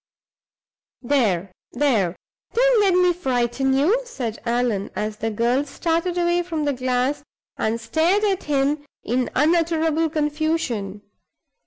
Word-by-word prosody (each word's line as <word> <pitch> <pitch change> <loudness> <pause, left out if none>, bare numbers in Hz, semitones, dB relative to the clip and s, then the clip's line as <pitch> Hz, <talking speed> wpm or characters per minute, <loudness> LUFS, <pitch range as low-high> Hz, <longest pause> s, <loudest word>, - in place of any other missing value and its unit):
"There! 210 -9 +1 0.2
there! 230 -10 +1 0.4
don't - - +4
let 385 -3 +3
me 360 -1 +4
frighten 265 -4 0
you," 380 - +3
said 250 - -5
Allan, 235 -4 0
as 210 0 -3
the 225 +1 -2
girl 235 +5 +1
started 335 +4 -1
away 345 0 +2
from 325 -4 -3
the 285 - +1
glass, 255 +2 -1 0.3
and 225 +1 -1
stared 320 - +1
at 390 -3 0
him 285 0 0 0.2
in 250 +1 0
unutterable 325 0 +2
confusion. 295 - -2
285 Hz, 125 wpm, -22 LUFS, 235-335 Hz, 0.4 s, don't